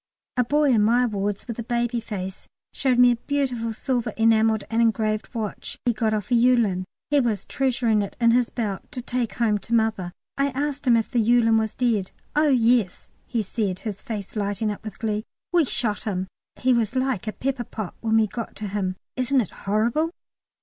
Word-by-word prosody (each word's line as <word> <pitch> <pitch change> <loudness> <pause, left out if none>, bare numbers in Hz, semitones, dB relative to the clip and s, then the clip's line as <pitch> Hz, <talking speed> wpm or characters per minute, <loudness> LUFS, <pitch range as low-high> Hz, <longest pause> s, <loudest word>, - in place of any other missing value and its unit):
A 250 - +3
boy 290 +3 +3
in 225 -4 +4
my 240 +4 +4
wards, 205 -3 -2
with 235 -1 -5
a - - -2
baby 240 +1 0
face, 190 -4 -6 0.3
showed 260 -3 +1
me 245 0 +7
a - - +2
beautiful 250 -4 -1
silver, 240 +1 -1
enamelled 225 -1 +3
and 225 +1 +2
engraved 215 -2 +1
watch 215 -3 -4
he 240 - +3
got 220 0 0
off 215 +2 -2
a - - +4
"Yewlan"; 230 -6 +3 0.3
he 290 - +5
was 225 -7 0
treasuring 245 -5 +1
it 200 - -5
in 235 -1 +5
his 245 0 +3
belt 210 -5 -4
"to 250 -3 -4
take 245 -2 -2
home 220 -4 +2
to 235 +3 -1
Mother." 220 -6 +1 0.3
I 275 - +3
asked 285 0 -2
him 235 -2 +6
if 225 - -1
the 245 - +2
Yewlan 225 0 +4
was 220 -1 -2
dead. 225 -7 +1 0.3
"Oh 300 0 +4
yes," 235 -6 +2 0.2
he 230 -3 -1
said, 195 -2 -2
his 205 -3 -5
face 210 -3 -6
lighting 205 +1 -1
up 205 - -7
with 215 - -7
glee; 215 -1 -1 0.3
"we 340 -3 +5
shot 225 -5 -1
him. 190 -3 -1 0.3
He 255 0 +2
was 235 0 0
like 260 -6 0
a - - 0
pepper 260 +1 -2
pot 215 -4 -6
when 225 -1 +2
we 220 - +5
got 230 +2 -6
to 210 -1 -5
him." 190 -2 -2 0.2
Isn't 255 +1 +2
it 210 - -5
horrible? 230 +10 0
230 Hz, 205 wpm, -24 LUFS, 210-245 Hz, 0.3 s, me